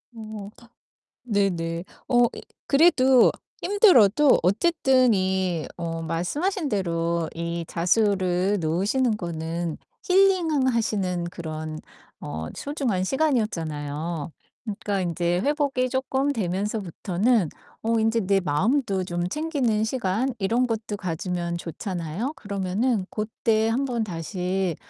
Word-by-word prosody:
어. 215 Hz, -2 st, -7 dB, 0.7 s
네네. 180 Hz, -6 st, -1 dB, 0.2 s
어 245 Hz, -1 st, +5 dB, 0.4 s
그래도 265 Hz, -4 st, +5 dB, 0.3 s
힘들어도 300 Hz, -, +5 dB
어쨌든 255 Hz, -, +3 dB
이 185 Hz, -4 st, 0 dB
어 165 Hz, -1 st, -3 dB
말씀하신 290 Hz, -, -1 dB
대로 170 Hz, -4 st, -1 dB
이 170 Hz, 0 st, -3 dB
자수를 185 Hz, +1 st, +1 dB
놓으시는 205 Hz, +9 st, +1 dB
거는 165 Hz, -1 st, -4 dB, 0.3 s
힐링하시는 260 Hz, -, +2 dB
그런 155 Hz, -2 st, -6 dB, 0.4 s
어 80 Hz, +2 st, -5 dB
소중한 270 Hz, -, -1 dB
시간이었잖아요. 165 Hz, -, -1 dB, 0.3 s
그러니까 200 Hz, -2 st, -2 dB
인제 175 Hz, +1 st, 0 dB
회복이 280 Hz, -3 st, 0 dB
쪼끔 265 Hz, +2 st, 0 dB
되면서부터는 195 Hz, -, 0 dB, 0.3 s
어 225 Hz, 0 st, +2 dB
인제 225 Hz, +1 st, +2 dB
내 195 Hz, +1 st, +2 dB
마음도 195 Hz, -, +1 dB
좀 175 Hz, 0 st, -2 dB
챙기는 270 Hz, -, 0 dB
시간 235 Hz, +2 st, -1 dB
이런 230 Hz, +6 st, +1 dB
것도 220 Hz, -2 st, -3 dB
가지면 175 Hz, -1 st, -3 dB
좋잖아요? 175 Hz, -, -4 dB
그러면은 200 Hz, +2 st, -1 dB
고때 220 Hz, +1 st, 0 dB
한번 245 Hz, -1 st, 0 dB
다시 180 Hz, -1 st, -2 dB
200 Hz, 245 characters per minute, -25 LUFS, 170-250 Hz, 0.7 s, 어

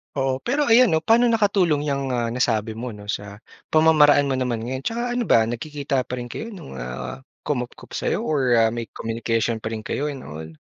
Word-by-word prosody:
Oo, 135 Hz, -1 st, -1 dB
pero 285 Hz, +4 st, +1 dB
ayan 235 Hz, -1 st, +6 dB
'no, 160 Hz, -, +3 dB
paano 225 Hz, +8 st, +4 dB
nakatulong 190 Hz, -9 st, +2 dB
yang, 140 Hz, -2 st, -1 dB
ah, 120 Hz, -2 st, 0 dB
nasabi 115 Hz, -2 st, 0 dB
mo 120 Hz, +2 st, -5 dB
'no 105 Hz, -1 st, -11 dB
sa 105 Hz, -1 st, -5 dB, 0.3 s
pamamaraan 150 Hz, -3 st, +5 dB
mo 135 Hz, -, 0 dB
naman 125 Hz, -3 st, -1 dB
ngayon? 130 Hz, +4 st, -4 dB
Tsaka 240 Hz, -, -2 dB
ano 245 Hz, -, 0 dB
ba 115 Hz, -, +4 dB
nagkikita 140 Hz, +2 st, -2 dB
pa 125 Hz, 0 st, -5 dB
rin 120 Hz, -, -5 dB
kayo 225 Hz, -, -6 dB
nung, 175 Hz, -, -10 dB
ah, 65 Hz, -, -6 dB, 0.2 s
kumupkop 125 Hz, -4 st, -4 dB
sa'yo -, -, -1 dB
or 130 Hz, -6 st, +2 dB
ah, 115 Hz, -, +5 dB
may 115 Hz, -1 st, -5 dB
communication 115 Hz, 0 st, -2 dB
pa 110 Hz, -, -3 dB
rin 110 Hz, -, -3 dB
kayo 145 Hz, +7 st, -3 dB
and 140 Hz, -, -7 dB
all? 80 Hz, +1 st, -8 dB
130 Hz, 205 wpm, -23 LUFS, 115-155 Hz, 0.3 s, ayan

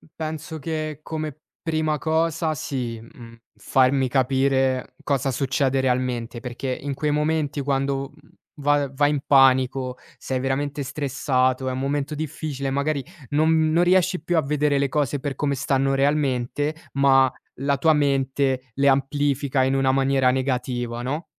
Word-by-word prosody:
penso 160 Hz, 0 st, -5 dB
che 155 Hz, -1 st, -4 dB
come 155 Hz, -2 st, -5 dB, 0.2 s
prima 155 Hz, -2 st, 0 dB
cosa 160 Hz, 0 st, 0 dB
sì, 125 Hz, -5 st, -4 dB
mhmm, 115 Hz, -2 st, -13 dB, 0.2 s
farmi 130 Hz, +4 st, +2 dB
capire 130 Hz, 0 st, +1 dB
cosa 135 Hz, -1 st, 0 dB
succede 135 Hz, 0 st, 0 dB
realmente, 125 Hz, -2 st, -1 dB
perché 125 Hz, +1 st, -4 dB
in 140 Hz, 0 st, -3 dB
quei 150 Hz, +2 st, -1 dB
momenti 150 Hz, -1 st, 0 dB
quando, 135 Hz, 0 st, -1 dB
mhmm, -, -, -22 dB, 0.3 s
va 145 Hz, -1 st, +2 dB
vai 145 Hz, +2 st, +2 dB
in 145 Hz, -, 0 dB
panico, 130 Hz, -1 st, +3 dB, 0.2 s
sei 130 Hz, -1 st, -3 dB
veramente 140 Hz, +2 st, -2 dB
stressato, 130 Hz, -2 st, 0 dB
è -, -, -2 dB
un 130 Hz, -, -3 dB
momento 145 Hz, +2 st, -2 dB
difficile, 150 Hz, -2 st, -4 dB
magari 140 Hz, +1 st, -1 dB, 0.3 s
non 155 Hz, +1 st, +3 dB
non 170 Hz, +2 st, +3 dB
riesci 185 Hz, 0 st, +2 dB
più 175 Hz, -, -1 dB
a -, -, +4 dB
vedere 150 Hz, 0 st, +1 dB
le 140 Hz, 0 st, +1 dB
cose 145 Hz, 0 st, 0 dB
per 140 Hz, 0 st, -4 dB
come 140 Hz, -1 st, -1 dB
stanno 135 Hz, +1 st, +1 dB
realmente, 140 Hz, 0 st, 0 dB, 0.2 s
ma 135 Hz, -1 st, +4 dB, 0.3 s
la 140 Hz, +1 st, +1 dB
tua 160 Hz, +3 st, +4 dB
mente 135 Hz, -2 st, 0 dB
le 140 Hz, +2 st, +1 dB
amplifica 140 Hz, 0 st, +1 dB
in 130 Hz, +1 st, +1 dB
una 135 Hz, -1 st, +3 dB
maniera 135 Hz, -1 st, +3 dB
negativa, 125 Hz, -2 st, -2 dB
no? 145 Hz, +7 st, -3 dB
140 Hz, 150 wpm, -23 LUFS, 130-150 Hz, 0.3 s, a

